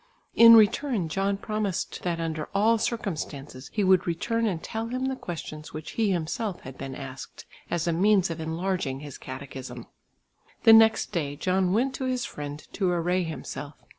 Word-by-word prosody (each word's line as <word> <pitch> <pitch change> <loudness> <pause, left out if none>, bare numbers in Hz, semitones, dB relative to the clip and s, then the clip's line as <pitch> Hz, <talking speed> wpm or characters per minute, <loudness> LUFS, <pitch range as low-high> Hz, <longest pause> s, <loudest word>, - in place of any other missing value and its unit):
In 230 0 +9
return 220 - +3
John 195 +3 0
promised 210 -3 -3
that 170 -2 -2
under 160 -2 -3
all 220 +3 +4
circumstances 150 - -4
he 210 - 0
would 185 -1 +4
return 230 +7 0
and 175 -6 -2
tell 225 +1 -4
him 255 +2 -2
the 265 0 -1
questions 155 -7 -7
which 155 0 -6
he 220 -3 +1
himself 185 +3 -2
had 130 0 -9
been 135 -1 -6
asked, 135 -1 -9 0.2
as 170 -1 -1
a 170 - +1
means 190 0 +3
of 165 0 -5
enlarging 160 -4 -2
his 145 -3 -9
catechism. 130 0 -8 0.8
The 225 - +9
next 225 0 +5
day 150 -7 -2
John 185 +3 +1
went 250 +7 +1
to 260 - -3
his 255 -1 -1
friend 145 0 -7
to 190 -3 0
array 175 +1 +1
himself. 145 -2 -6
180 Hz, 170 wpm, -27 LUFS, 155-215 Hz, 0.8 s, In